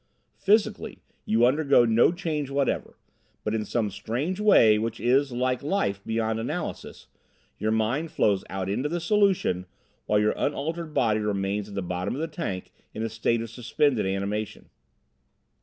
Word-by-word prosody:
Physically 205 +2 +1 0.3
you 115 +2 +3
undergo 140 -1 +4
no 115 +6 +4
change 160 -5 -3
whatever; 140 -1 -1 0.5
but 105 - -1
in 110 -1 0
some 105 -2 -1
strange 120 - -3
way 115 - +6
which 115 +2 -3
is, 135 +3 +2
like 125 +1 0
life, 140 - -1
beyond 110 0 -1
analysis, 155 +9 -5 0.5
your 110 - 0
mind 115 +9 0
flows 105 - +1
out 95 -1 -3
into 125 +9 -1
the 175 +2 -2
solution, 180 - +1 0.4
while 105 - +3
your 105 +1 +2
unaltered 155 +2 -3
body 110 -3 +2
remains 100 0 -2
at 100 - -9
the 100 - -2
bottom 90 +4 -3
of - - -5
the 165 - -1
tank 125 - -5 0.2
in 110 - -3
a 115 - -1
state 115 +1 0
of 115 - -8
suspended 125 -2 0
animation. 100 +2 -3
115 Hz, 155 wpm, -26 LUFS, 105-150 Hz, 0.5 s, way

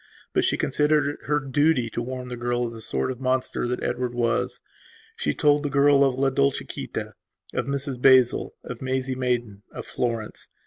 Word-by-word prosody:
But - - +2
she - - +1
considered 150 0 +2
it - - 0
to - - -9
be - - -19
her 150 0 +2
duty 145 -1 +2
to - - -3
warn 125 +1 -5
the 125 - -4
girl 120 0 -1
of 115 - -5
the 115 - -9
sort 115 - -2
of 130 0 -8
monster 130 -1 0
that 125 +1 -3
Edward 125 -1 -2
was. 115 -1 0 0.6
She 75 - -1
told 145 0 +3
the 145 - -2
girl 140 0 +5
of 135 -2 +2
La 135 +1 +1
Dolciquita, 140 +1 -2 0.4
of - - -2
Mrs 140 -2 -3
Basil, 130 -2 +4
of 125 - -7
Maisie 130 0 -1
Maidan, 120 -5 -2
of - - -7
Florence. 115 -3 -3
130 Hz, 195 wpm, -25 LUFS, 120-140 Hz, 0.6 s, girl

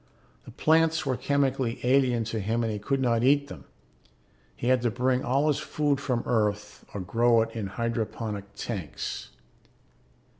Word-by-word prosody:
The - - -10
plants 160 0 +2
were 130 -2 0
chemically 135 -3 0
alien 125 -2 +3
to 110 0 -3
him 115 +4 0
and 110 -1 -1
he 105 - -4
could 135 +7 -1
not 120 -2 +2
eat 140 +2 +3
them; - - -10 0.9
he 120 - -2
had 130 -1 +4
to 120 - +1
bring 125 +2 0
all 135 +4 +1
his 150 -1 +2
food 150 -2 0
from 125 -4 -1
Earth 105 -2 -1
or 100 - -3
grow 115 +4 +3
it 115 - -7
in 110 -3 -3
hydroponic 110 -1 -3
tanks. 90 - -5
120 Hz, 160 wpm, -27 LUFS, 110-135 Hz, 0.9 s, had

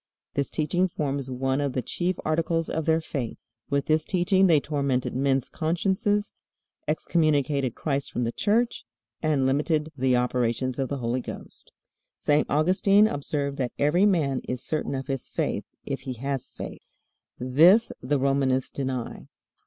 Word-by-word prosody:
This 140 -2 0
teaching 175 +4 +1
forms 140 -5 -3
one 130 +2 0
of 140 -2 -1
the 130 - -1
chief 180 +8 -1
articles 165 +1 0
of 160 0 -2
their 160 0 +3
faith. 135 -7 -4 0.3
With 140 -1 0
this 155 0 +2
teaching 190 +2 +3
they 160 -4 +5
tormented 140 -4 -1
men's 135 -1 +1
consciences, 195 +6 0 0.5
excommunicated 145 -5 +1
Christ 140 -2 -2
from 125 - -1
the 115 - 0
Church, 225 - +1 0.4
and 150 -4 +2
limited 150 +3 +1
the 130 -1 +2
operations 125 +1 0
of 135 - -1
the 140 - -2
Holy 125 0 -1
Ghost. - - -9 0.4
St. 150 0 +2
Augustine 190 +7 +4
observed 140 -3 -2
that 125 -2 -1
"every 175 +8 +4
man 145 -9 +1
is 125 0 -3
certain 155 -3 -2
of 135 0 -4
his 135 -2 -4
faith, - - -2 0.2
if - - -3
he 130 - -5
has 135 +2 -4
faith." - - -8 0.6
This 165 - +5
the 145 +3 +1
Romanists 135 -1 +1
deny. 130 -3 -4
140 Hz, 155 wpm, -26 LUFS, 130-165 Hz, 0.6 s, they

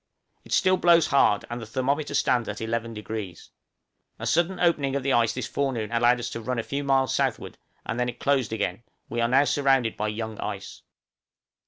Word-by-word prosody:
It - - -16
still 185 0 +3
blows 170 -3 +5
hard, 105 -8 +3
and 120 0 -5
the - - -6
thermometer 140 +5 -1
stands 125 -5 +1
at - - -5
11°. 110 -4 -5 0.7
A - - -6
sudden 175 +3 +1
opening 145 -6 +1
of 140 - -1
the 135 0 +1
ice 115 -2 +3
this - - -4
forenoon 120 -7 -2
allowed 120 +1 +3
us 120 +1 -4
to 115 - -5
run 125 +3 -3
a 115 - -1
few 140 +4 -3
miles 135 -1 +2
southward, - - -2 0.3
and 115 - -3
then 125 0 +1
it - - -8
closed 135 -5 +1
again; 105 -2 -2 0.3
we 120 0 -2
are 115 - +3
now 135 +3 +4
surrounded 135 -5 +2
by 105 - -2
young 110 0 -5
ice. - - -6
125 Hz, 195 wpm, -25 LUFS, 115-140 Hz, 0.7 s, blows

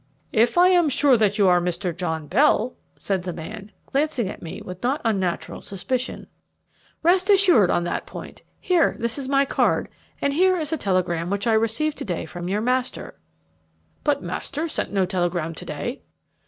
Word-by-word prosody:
"If 230 +8 +3
I 360 +1 +7
am 350 -4 +4
sure 280 -1 +4
that 210 -2 +2
you 200 -2 +4
are 180 -1 +4
Mr. 180 0 -2
John 160 -3 -3
Bell," 245 - +2 0.2
said 195 -2 -2
the 180 - -6
old 175 - -4
man, 205 +5 -8
glancing 275 -6 0
at - - -8
me 165 - -7
with 180 0 -9
not 265 +5 0
unnatural 190 -6 -1
suspicion. 245 +7 -3 0.8
"Rest 365 +4 +3
assured 365 - +6
on 175 - +1
that 175 - -3
point. - - -9 0.2
Here, 355 -3 +2
this 235 +3 -1
is 265 -1 -4
my 275 0 +3
card, - - +1 0.3
and 280 - 0
here 370 +4 +3
is 315 -1 -3
a - - +3
telegram 180 - 0
which 200 0 -1
I 230 - +3
received 230 +8 0
to - - -4
day 175 -4 -3
from 175 +2 -6
your 205 +2 0
master." 250 - -2 0.8
"But 285 -1 +1
master 310 +3 -3
sent - - -3
no 195 -2 +2
telegram 175 -3 -1
to - - -8
day." - - -5
220 Hz, 185 wpm, -23 LUFS, 180-285 Hz, 0.8 s, I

